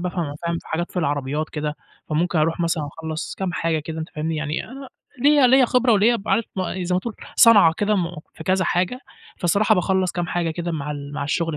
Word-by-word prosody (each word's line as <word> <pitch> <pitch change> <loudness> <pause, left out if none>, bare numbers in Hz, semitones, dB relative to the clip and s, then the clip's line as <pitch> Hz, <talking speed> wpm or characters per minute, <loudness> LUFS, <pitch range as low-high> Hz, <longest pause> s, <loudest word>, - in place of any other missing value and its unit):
بافهم، 175 -4 -3
فاهم، 170 0 -1
في - - -15
حاجات 175 +2 -2
في 180 - -3
العربيات 145 0 -1
كده. 150 0 -3 0.3
فممكن 165 +2 0
اروح 165 +2 +1
مثلًا 165 -3 0
اخلّص 160 +2 -6
كام 190 -2 -3
حاجة 165 -2 0
كده 160 +2 -6
أنت 160 - -5
فاهمني، 160 +1 -3
يعني 155 +1 -2
أ 270 +2 -10 0.3
ليّا 290 -2 +6
ليّا 260 +1 +6
خبرة 250 0 +3
وليّا 220 +4 +4
ب 200 - -10
عارف 230 - +2 0.4
زي 180 +1 -1
ما 180 - +1
تقول 230 +2 -5 0.2
صنعة 210 -8 +7
كده 210 0 +1
مو 170 -3 -3
في - - -10
كذا 185 0 +2
حاجة، 180 +9 0 0.4
فالصراحة 200 +5 +3
باخلّص 190 -1 +1
كام 175 0 -2
حاجة 175 -2 -1
كده 170 +1 -4
مع 150 -2 -4
ال 145 -1 -6
مع 140 - -3
الشغل 165 +2 -1
170 Hz, 220 wpm, -22 LUFS, 155-195 Hz, 0.4 s, صنعة